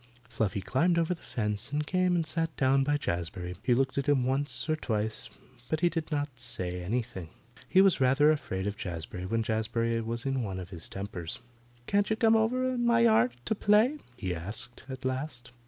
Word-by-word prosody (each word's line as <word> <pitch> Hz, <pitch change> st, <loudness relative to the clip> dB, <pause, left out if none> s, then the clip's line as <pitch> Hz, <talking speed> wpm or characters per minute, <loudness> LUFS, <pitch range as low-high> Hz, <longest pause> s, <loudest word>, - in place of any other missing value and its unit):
Fluffy 100 Hz, -2 st, -1 dB
climbed 160 Hz, -, +2 dB
over 170 Hz, +1 st, +2 dB
the 170 Hz, -, -11 dB
fence 105 Hz, +1 st, -3 dB
and 150 Hz, +1 st, 0 dB
came 185 Hz, +1 st, +2 dB
and 165 Hz, -2 st, +1 dB
sat 165 Hz, -1 st, -2 dB
down 135 Hz, 0 st, +4 dB
by 145 Hz, +1 st, +2 dB
Jazbury. 90 Hz, -, -3 dB
He 120 Hz, +1 st, +3 dB
looked 135 Hz, +2 st, +1 dB
at 140 Hz, +1 st, -1 dB
him 135 Hz, -3 st, +4 dB
once 130 Hz, 0 st, -1 dB
or 155 Hz, -, +2 dB
twice, 110 Hz, -6 st, -2 dB, 0.4 s
but 155 Hz, 0 st, 0 dB
he 175 Hz, -, +4 dB
did 165 Hz, -1 st, -3 dB
not 145 Hz, -4 st, -2 dB
say 90 Hz, -7 st, -4 dB
anything. 100 Hz, -2 st, -3 dB, 0.4 s
He 190 Hz, -, +6 dB
was 190 Hz, -7 st, +4 dB
rather 135 Hz, +4 st, +5 dB
afraid 95 Hz, -11 st, -2 dB
of 100 Hz, 0 st, -2 dB
Jazbury 90 Hz, +1 st, -5 dB
when 115 Hz, +1 st, +1 dB
Jazbury 115 Hz, 0 st, 0 dB
was 115 Hz, +2 st, -3 dB
in 135 Hz, -1 st, 0 dB
one 95 Hz, -4 st, -3 dB
of 90 Hz, +1 st, -8 dB
his 85 Hz, -3 st, -7 dB
tempers. 95 Hz, -4 st, -4 dB, 0.5 s
"Can't 200 Hz, +6 st, +2 dB
you 220 Hz, -, +2 dB
come 225 Hz, 0 st, +4 dB
over 245 Hz, +4 st, +2 dB
in 240 Hz, -1 st, -1 dB
my 235 Hz, -1 st, +4 dB
yard 220 Hz, -, +5 dB
to -, -, +1 dB
play?" 220 Hz, +8 st, +3 dB, 0.2 s
he 95 Hz, -6 st, -2 dB
asked 110 Hz, +10 st, -4 dB
at 130 Hz, 0 st, -7 dB
last. 130 Hz, -2 st, -3 dB
130 Hz, 200 wpm, -29 LUFS, 105-160 Hz, 0.5 s, He